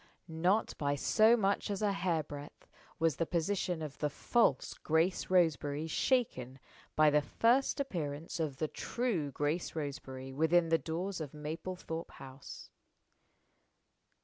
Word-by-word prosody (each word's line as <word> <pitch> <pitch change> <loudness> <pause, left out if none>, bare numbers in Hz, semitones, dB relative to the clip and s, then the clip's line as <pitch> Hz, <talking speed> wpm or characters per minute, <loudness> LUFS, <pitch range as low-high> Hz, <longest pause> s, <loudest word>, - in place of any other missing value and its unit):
Not 180 +6 +1
by 145 -1 +1
so 220 - +4
much 200 0 0
as 200 +1 -2
a 205 - +3
hair 175 -5 0
breadth 145 0 -10 0.3
was 165 -3 +1
the 165 - 0
position 175 -1 -1
of 150 -2 -7
the 150 - 0
false 145 - +1
Grace 165 +4 0
Roseberry 155 -4 +2
shaken 160 - 0 0.4
by 155 -1 +5
the 150 0 +4
first 240 - +2
appearance 165 - -3
of 150 -5 -2
the 155 - -1
true 190 - -2
Grace 150 +6 -2
Roseberry 135 -3 -5
within 165 +3 +3
the 165 0 +3
doors 175 +3 -3
of 150 -1 -6
Mablethorpe 160 +2 -5
House. 135 +1 -11
160 Hz, 135 wpm, -33 LUFS, 145-185 Hz, 0.4 s, by